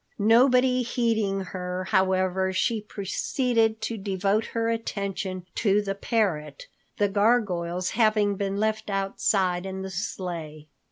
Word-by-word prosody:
Nobody 250 +4 +4
heeding 225 -5 0
her, 180 0 -4
however, 190 -1 +1
she 215 +4 0
proceeded 220 +2 0
to 230 - -3
devote 195 +2 0
her 230 -1 -1
attention 200 -5 -3
to 205 -2 +2
the 200 -1 -2
parrot, 200 - -1 0.3
the 205 - +3
gargoyles 195 -4 +1
having 215 -3 +2
been 195 0 -2
left 220 +1 -1
outside 195 -2 0
in 190 0 -5
the 190 - -6
sleigh. 170 -5 -5
200 Hz, 120 wpm, -26 LUFS, 185-220 Hz, 0.3 s, Nobody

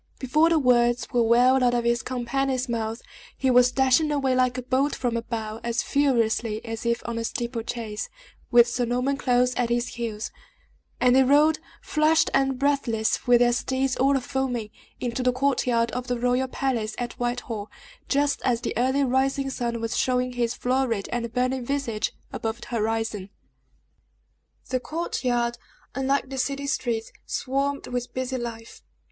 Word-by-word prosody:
Before 305 +6 +3
the 335 - +3
words 240 -3 +3
were 240 - +3
well 250 +3 +4
out 245 0 +3
of 240 - +1
his 235 +1 +1
companion's 260 +1 -1
mouth, 225 -1 -3 0.3
he 265 -1 +2
was 250 0 +5
dashing 265 +4 +3
away 270 -3 +1
like 255 0 +2
a 255 - -4
bolt 265 +3 +1
from 245 -2 -1
a 230 - 0
bow, 225 -2 -5
as 235 0 -1
furiously 230 -5 +1
as 225 0 -4
if 235 0 0
on 235 -1 -3
a - - -2
steeple 235 0 -3
chase, 220 -2 -5 0.4
with 240 -1 +6
Sir 245 +1 -1
Norman 250 +4 0
close 250 -2 +2
at 245 -2 +1
his 240 +1 0
heels; 230 -2 -4 0.7
and 250 0 +4
they 265 - +7
rode, 295 +4 +4 0.2
flushed 310 +1 +3
and 270 -1 +2
breathless, 250 -7 0
with 245 -1 +6
their 240 0 +4
steeds 260 +2 0
all 275 +1 +3
a - - -2
foaming, 250 -4 -2 0.3
into 245 0 -2
the 250 0 +3
court 260 +1 0
yard 230 -1 +2
of 250 +2 -4
the 245 -1 -1
royal 250 +2 +1
palace 245 -5 -2
at 245 -1 -3
Whitehall, 240 -3 -3 0.4
just 285 0 +1
as 245 -2 +1
the - - -3
early 260 +3 +2
rising 270 +1 +1
sun 235 -2 -2
was 225 0 -3
showing 250 0 +1
his 240 -1 -1
florid 250 -5 0
and 235 -1 -2
burning 255 +1 0
visage 240 -5 -2 0.2
above 225 +1 -3
the - - -9
horizon. 225 -3 -2 1.4
The 255 - 0
court 325 +6 -4
yard, 240 -1 0 0.3
unlike 270 +1 0
the 265 - -3
city 280 +2 -1
streets, 240 -6 -2 0.2
swarmed 275 +2 -1
with 245 0 -4
busy 260 0 -2
life. 230 -2 -7
250 Hz, 175 wpm, -25 LUFS, 235-265 Hz, 1.4 s, they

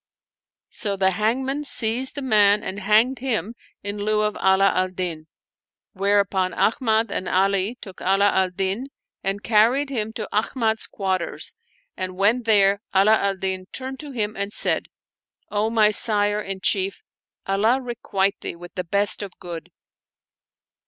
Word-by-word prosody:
So 200 -2 -2
the 190 0 +3
hangman 260 +8 -1
seized 250 -1 +1
the 285 - -5
man 210 -4 +4
and 195 - -5
hanged 215 +6 +3
him 235 -4 -2 0.3
in 205 +1 -5
lieu 210 +1 +1
of 210 0 -1
Ala 190 +1 +3
al 185 +1 +1
Din; 175 -4 -5 0.7
whereupon 195 -2 +1
Ahmad 225 -2 +1
and 185 - -3
Ali 195 +4 +1
took 190 -2 -11
Ala 195 +2 +3
al 190 -1 +1
Din 195 +7 -3 0.4
and 195 +1 -2
carried 240 +6 +3
him 220 -4 -2
to - - -5
Ahmad's 220 0 0
quarters 190 -3 -3 0.4
and, 185 0 -5
when 215 +6 +3
there, 200 -2 +4
Ala 200 +3 +5
al 200 -2 0
Din 190 0 -3
turned 265 0 -6
to 300 - -7
him 215 -4 -3
and 200 +1 -3
said, - - 0 0.6
"O 210 +1 0
my 215 -2 +4
sire 205 0 +5
and 195 -2 -6
chief, 195 0 0 0.4
Allah 215 +6 +2
requite 220 -6 -2
thee - - -5
with 175 +1 -12
the 180 - -3
best 200 +4 0
of 200 -3 -8
good 170 -3 -8
205 Hz, 150 wpm, -23 LUFS, 190-225 Hz, 0.7 s, Ala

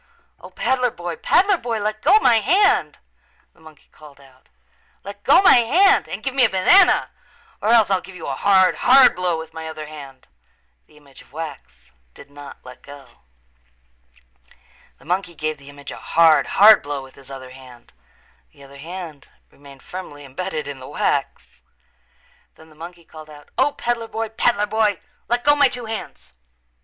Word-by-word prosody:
"O, - - -13
peddler 250 -1 -1
boy, 175 -5 -7
peddler 390 - +2
boy, 235 -6 -4
let 215 +1 -4
go 380 +8 +5
my 230 - +4
hand," 390 - +1 0.6
the - - -28
monkey 155 -2 -18
called 150 -2 -17
out. 130 -2 -22 0.5
"Let 200 +1 -11
go 290 +8 +4
my 370 - +7
hand 360 - +3
and - - -7
give 265 - -3
me 265 -1 +3
a 235 - +4
banana 345 - +3 0.5
or 215 - -1
else 225 -4 +4
I'll 190 -1 +1
give 190 - -14
you 165 - -9
a 140 - -4
hard, 190 +2 +2
hard 260 +1 +5
blow 180 -2 -1
with 160 0 -10
my 160 0 -8
other 155 -1 -8
hand." 140 -4 -13 0.6
The 150 - -23
image 140 -2 -19
of - - -23
wax 130 - -10 0.2
did 140 - -16
not 145 -2 -13
let 125 0 -13
go. 140 -1 -15 1.8
The - - -22
monkey 180 +1 -3
gave 155 -1 -4
the 140 0 -15
image 145 0 -11
a - - -9
hard, 165 -2 +3
hard 215 +2 +6
blow 145 -1 -6
with 130 - -15
his 135 -1 -17
other 130 -2 -10
hand. 130 -2 -16 0.6
The 140 - -18
other 140 0 -15
hand 165 -2 -9 0.2
remained 140 -1 -17
firmly 145 -6 -10
embedded 155 +2 -6
in 140 -2 -8
the 130 - -11
wax. - - -3 0.9
Then 160 0 -19
the - - -20
monkey 170 +2 -12
called 155 -1 -14
out, 145 -1 -15
"O, 290 - +1
peddler 235 -1 -3
boy, 225 0 -5
peddler 220 -1 0
boy, 210 -3 0 0.3
let 240 +2 -1
go 290 0 +4
my 285 -1 +4
two 245 -2 -8
hands. 220 0 -8
170 Hz, 180 wpm, -20 LUFS, 145-225 Hz, 1.8 s, my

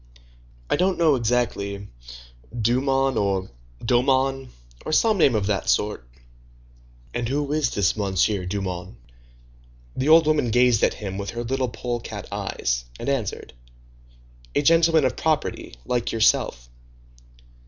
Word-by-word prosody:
"I - - +1
don't 185 +1 +1
know 165 -3 +4
exactly; 110 -5 -1 0.7
Dumont, 135 +4 +1
or 95 -4 -1 0.3
Daumont, 130 +2 +1 0.3
or - - -5
some 215 +5 +3
name 135 -7 +4
of 105 -2 0
that 100 -2 -1
sort." 105 -13 0 1.0
"And 120 -1 -2
who 145 +1 -1
is 150 -4 +1
this 100 -2 +1
Monsieur 100 -1 0
Dumont?" 95 -2 -4 1.0
The 135 +4 -1
old 160 0 +7
woman 150 -5 +2
gazed 120 -1 +3
at - - +2
him 95 -2 -6
with 100 -1 -4
her 120 +2 -4
little 130 +1 -1
polecat 120 0 -5
eyes, - - -2
and - - -3
answered:— 130 -8 -3 1.0
"A - - +2
gentleman 165 -1 +4
of 130 - 0
property, 155 - -2
like 120 -1 -1
yourself." 65 - +1
120 Hz, 130 wpm, -23 LUFS, 100-135 Hz, 1.0 s, old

